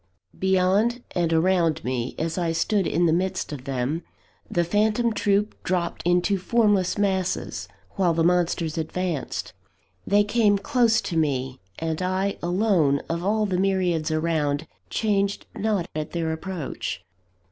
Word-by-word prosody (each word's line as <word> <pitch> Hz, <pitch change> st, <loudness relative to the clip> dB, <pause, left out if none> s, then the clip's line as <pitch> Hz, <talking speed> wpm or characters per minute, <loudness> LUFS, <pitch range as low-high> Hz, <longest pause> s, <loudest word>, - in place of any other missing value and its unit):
Beyond 190 Hz, +6 st, +2 dB
and 170 Hz, -2 st, 0 dB
around 165 Hz, -1 st, +2 dB
me, 125 Hz, 0 st, -2 dB
as 160 Hz, 0 st, -2 dB
I 170 Hz, -2 st, 0 dB
stood 195 Hz, +3 st, +1 dB
in 175 Hz, +2 st, +2 dB
the 160 Hz, -, +3 dB
midst 185 Hz, +1 st, -1 dB
of 135 Hz, -3 st, -7 dB
them, 135 Hz, +4 st, -1 dB, 0.5 s
the 175 Hz, -, +1 dB
phantom 215 Hz, +6 st, +1 dB
troop 205 Hz, 0 st, +1 dB
dropped 175 Hz, -2 st, -1 dB
into 180 Hz, +3 st, +2 dB
formless 205 Hz, -2 st, +2 dB
masses, 190 Hz, -3 st, -1 dB, 0.3 s
while 185 Hz, -3 st, +3 dB
the 165 Hz, -, +2 dB
monsters 170 Hz, -2 st, +1 dB
advanced. 165 Hz, -1 st, -3 dB, 0.5 s
They 205 Hz, +1 st, +4 dB
came 210 Hz, -1 st, +3 dB
close 235 Hz, -1 st, +2 dB
to 175 Hz, -, -4 dB
me; 135 Hz, -4 st, 0 dB, 0.2 s
and 160 Hz, +1 st, -2 dB
I 190 Hz, +2 st, -1 dB
alone, 175 Hz, -6 st, +2 dB
of 170 Hz, +1 st, -2 dB
all 210 Hz, +2 st, +1 dB
the 185 Hz, -3 st, -1 dB
myriads 185 Hz, -5 st, +1 dB
around, 155 Hz, -2 st, 0 dB, 0.2 s
changed 200 Hz, -2 st, 0 dB
not 205 Hz, -5 st, 0 dB
at 155 Hz, 0 st, -4 dB
their 165 Hz, -2 st, -1 dB
approach. 165 Hz, -2 st, -5 dB
180 Hz, 140 wpm, -24 LUFS, 160-200 Hz, 0.5 s, They